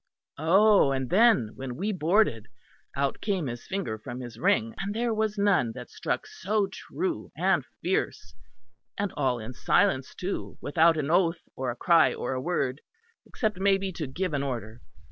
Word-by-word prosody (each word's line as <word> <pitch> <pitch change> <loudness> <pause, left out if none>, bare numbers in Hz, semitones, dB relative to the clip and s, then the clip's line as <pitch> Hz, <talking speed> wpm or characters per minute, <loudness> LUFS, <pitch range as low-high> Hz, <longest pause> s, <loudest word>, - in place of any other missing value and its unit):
Oh! 195 0 +5
and 130 -2 -2
then 195 - +4
when 130 -2 -6
we 200 +8 -1
boarded, 175 - +2 0.5
out 140 0 -1
came 195 -6 -1
his 120 -2 -6
finger 125 - -3
from 120 +3 -7
his 120 -3 -8
ring; 115 -2 +2
and 200 +1 -3
there 235 0 0
was 215 -1 -1
none 195 - +2
that - - -9
struck - - -2
so 220 - -1
true 345 - -4
and - - +2 0.2
fierce; - - -1 0.6
and 205 -3 -2
all 130 -4 +1
in 115 +2 -7
silence 135 - +1
too, 190 +2 -4
without 160 +2 +3
an 150 0 -1
oath 170 -1 +2
or 130 -1 -2
a 120 - -3
cry 165 +5 +4
or - - -3
a 130 - -2
word; 140 -4 -1 0.5
except 215 -6 -2
maybe 195 0 +2
to 160 -4 -5
give 175 +6 -3
an 140 - 0
order. 120 -4 -5
165 Hz, 170 wpm, -27 LUFS, 130-200 Hz, 0.6 s, Oh